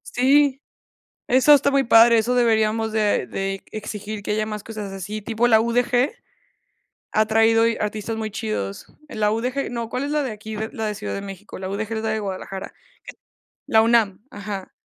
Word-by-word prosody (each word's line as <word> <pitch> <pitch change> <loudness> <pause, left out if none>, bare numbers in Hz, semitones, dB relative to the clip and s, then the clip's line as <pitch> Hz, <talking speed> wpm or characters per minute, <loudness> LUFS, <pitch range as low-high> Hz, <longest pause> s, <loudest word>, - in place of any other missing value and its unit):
Sí, 275 +2 +3 0.7
eso 260 +4 +6
está 280 0 +3
muy 275 -1 +2
padre. 230 0 +6
Eso 235 +3 +1
deberíamos 225 -2 +2
de 215 -1 +1
de 195 0 -3
exigir, 210 0 -6
que 205 - -2
haya 215 0 0
más 210 -1 -6
cosas 210 -3 -6
así. 200 +3 -6
Tipo 225 +3 0
la 220 -2 +6
UDG 245 +3 +1 1.0
ha 215 0 +3
traído 225 +1 +4 0.2
artistas 215 +1 -3
muy 220 -1 -4
chidos. 105 - -4 0.2
La 210 -6 0
UDG 250 +5 -2
no, 235 -2 -4
¿cuál 250 +4 -3
es 285 - -3
la 300 -1 +1
de 265 - -3
aquí 215 0 -8
de 220 +1 -4
la 220 - -3
de 210 - -2
Ciudad - - -5
de 200 - -4
México? 195 +1 -9
La 185 0 -5
UDG 210 +3 -4
es 220 - -3
la 220 - -1
de 220 0 -1
Guadalajara. 195 -1 -6 0.9
La 220 - +4
UNAM, 225 -4 +2
ajá. 200 -2 -7
220 Hz, 185 wpm, -22 LUFS, 210-235 Hz, 1.0 s, eso